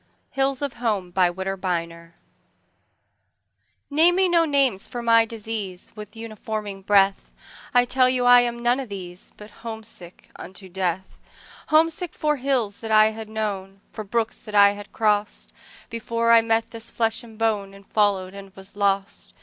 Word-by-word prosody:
Hills 270 0 0
of 280 -3 -2
Home 205 -7 -2
NAME 175 -2 -1 2.0
me 380 0 +3
no 335 -1 +4
names 275 -9 +1
for 240 -1 -6
my 230 -1 +5
disease, 215 -5 -6
With 210 -1 -10
uninforming 215 -3 -6
breath;I 200 +4 +1
tell 255 +1 +3
you 250 -1 0
I 245 0 +8
am 235 0 -3
none 245 +2 +2
of 260 -4 -6
these, 180 -2 -8
But 210 0 -12
homesick 220 -6 -10
unto 190 +1 -10
death—Homesick 250 - -2
for 300 -1 0
hills 250 -6 -1
that 225 -1 -6
I 215 0 +6
had 220 0 -8
known, 200 -3 -4
For 215 - -6
brooks 225 +2 -2
that 210 -2 -8
I 200 0 +7
had 205 0 -10
crossed, 210 -1 -1 0.4
Before 230 0 0
I 230 0 +8
met 225 0 0
this 230 -1 -8
flesh 225 -1 0
and 225 -2 -14
boneAnd 200 -3 -2
followed 195 -3 +1
and 195 -1 -11
was 195 +1 -8
lost. 195 - -1
215 Hz, 145 wpm, -23 LUFS, 195-235 Hz, 2.0 s, I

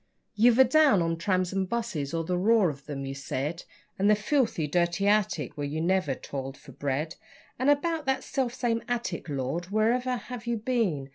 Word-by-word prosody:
You've 230 +2 +4
a 265 - +9
down 265 - +4
on 165 0 0
'trams 185 +2 0
and 190 -1 -1
buses', 225 -12 -2
or 165 0 -1
the 180 +2 -1
'roar' 200 -1 +3
of 140 +1 -14
'em, 140 -2 -4
you 135 - -4
said, 140 +4 -4 0.3
And 200 +2 +3
the 210 - +6
'filthy, 225 - 0
dirty 175 +5 0
attic', 205 - +1
where 145 -1 -3
you 150 +2 -3
never 170 -4 +1
toiled 135 0 -6
for 145 - -14
bread. 145 +4 -3 0.4
(And 260 +3 +2
about 305 +1 +1
that 265 0 +1
self 260 -3 -1
same 230 -2 0
attic 230 -9 -3
Lord! 140 +5 -2
wherever 235 +5 +1
have 240 +1 -8
you 235 -1 0
been? 210 - -1
190 Hz, 195 wpm, -28 LUFS, 150-235 Hz, 0.4 s, a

